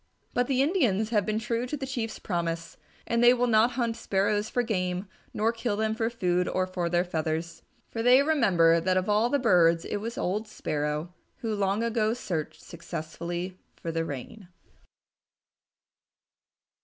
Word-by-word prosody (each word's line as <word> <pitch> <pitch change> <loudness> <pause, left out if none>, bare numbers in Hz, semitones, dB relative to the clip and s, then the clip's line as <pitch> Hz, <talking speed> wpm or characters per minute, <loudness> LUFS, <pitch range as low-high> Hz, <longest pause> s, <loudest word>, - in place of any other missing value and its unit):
But 245 0 +1
the 270 -1 +2
Indians 240 - +1
have 210 -3 +1
been 215 0 0
true 230 +2 -2
to 295 - -3
the 270 - -4
Chief's 235 -4 -3
promise, 170 -2 -3 0.3
and 235 0 +1
they 245 +1 +7
will 245 0 +1
not 230 +1 +4
hunt 235 -2 -1
Sparrows 205 +1 0
for 245 - 0
game 185 -4 -2 0.2
nor 220 +2 +1
kill 230 -2 -2
them 220 0 0
for 225 0 0
food 180 -6 0
or 185 - 0
for 180 -2 -2
their 175 +1 +2
feathers. 160 -1 -3 0.3
For 225 - -3
they 250 +3 +6
remember 190 - +4
that 185 +2 +1
of 185 +2 0
all 210 +3 +3
the 285 - +2
birds 170 -9 +4
it - - -2
was 230 +4 -5
old 210 +5 -1
Sparrow 150 +2 -3 0.3
who 225 -2 -2
long 200 +1 0
ago 225 -1 +1
searched 165 -10 -4
successfully 170 +2 -6 0.2
for 165 - -5
the 165 0 -1
Rain. 165 - -7
210 Hz, 170 wpm, -27 LUFS, 175-235 Hz, 0.3 s, they